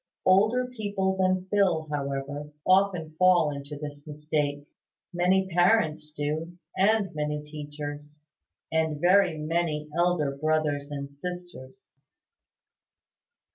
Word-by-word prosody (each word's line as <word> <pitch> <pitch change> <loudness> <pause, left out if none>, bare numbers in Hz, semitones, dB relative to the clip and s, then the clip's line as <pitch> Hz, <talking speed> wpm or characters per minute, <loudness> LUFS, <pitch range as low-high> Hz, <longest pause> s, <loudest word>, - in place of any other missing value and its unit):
Older 215 +7 +4
people 205 -6 -2
than 185 -1 +1
Phil, 180 -6 +2
however, 140 +1 -4
often 185 -4 +3
fall 180 -4 +5
into 140 +1 -7
this 145 0 -8
mistake. 150 -1 -2 0.5
Many 185 +2 +2
parents 175 -4 +2
do, 155 +3 -3 0.2
and 200 +1 +2
many 150 -1 -2
teachers; 150 0 -7 0.5
and 160 -2 0
very 180 -1 +4
many 155 -1 -2
elder 170 -5 +1
brothers 150 -1 0
and 140 -1 -6
sisters. 175 0 -9
155 Hz, 100 wpm, -27 LUFS, 150-185 Hz, 0.5 s, fall